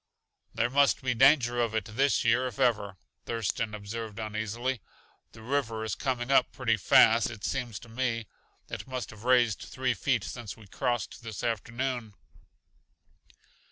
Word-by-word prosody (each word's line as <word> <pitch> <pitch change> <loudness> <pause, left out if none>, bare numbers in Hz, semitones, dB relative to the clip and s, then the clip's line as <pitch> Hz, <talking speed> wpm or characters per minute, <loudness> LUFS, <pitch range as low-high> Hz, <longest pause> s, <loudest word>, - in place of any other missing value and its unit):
"There 120 - +1
must 140 -1 +3
be 125 -1 +1
danger 120 -1 +4
of 115 -2 -1
it 110 - 0
this 135 +6 +1
year 125 +3 +3
if 120 - -8
ever," 100 -5 +1 0.3
Thurston 110 -1 -2
observed 105 +1 -6
uneasily. 110 +3 -3 0.5
"The 110 - -13
river 115 -4 -1
is 110 - -2
coming 130 -1 -2
up 130 -2 +4
pretty 115 -3 +1
fast, 110 +3 +5
it 110 -4 -10
seems 120 -6 -2
to 120 - -12
me. 115 -1 -2 0.4
It - - -6
must 130 -2 -5
have 110 +1 -13
raised 120 -7 +4
three - - -2
feet - - 0
since 115 -4 -7
we 110 - -14
crossed 120 +2 -2
this 115 -2 -7
afternoon." 120 0 -2
115 Hz, 155 wpm, -29 LUFS, 110-125 Hz, 0.5 s, fast